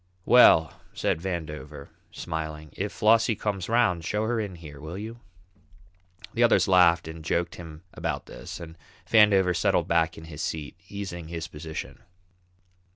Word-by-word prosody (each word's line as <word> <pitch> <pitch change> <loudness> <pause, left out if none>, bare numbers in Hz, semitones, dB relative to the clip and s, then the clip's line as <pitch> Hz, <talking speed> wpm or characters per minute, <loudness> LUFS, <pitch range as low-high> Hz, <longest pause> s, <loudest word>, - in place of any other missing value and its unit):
"Well," 80 -10 +6
said - - -1
Vandover, 75 -5 -6 0.2
smiling, 80 -2 -6
"if 100 +2 -3
Flossie 115 +1 +3
comes 100 -2 -3
'round 110 -8 +2
show 105 +6 -1
her 115 +1 0
in 100 -4 -4
here, 75 -4 -11
will 80 +4 -7
you?" 110 +3 -7 1.1
The - - -1
others - - +4
laughed, 85 -3 +5
and 80 0 -8
joked 85 +1 -1
him 80 -1 -10
about - - -3
this, - - -9
and 80 -1 -10 0.3
Vandover 100 -5 +5
settled - - +1
back 85 -1 +1
in 80 - -10
his 80 -2 -8
seat, 80 -4 -4
easing 95 -5 -6
his 85 -1 -5
position. 75 -4 -8
85 Hz, 150 wpm, -26 LUFS, 80-100 Hz, 1.1 s, Well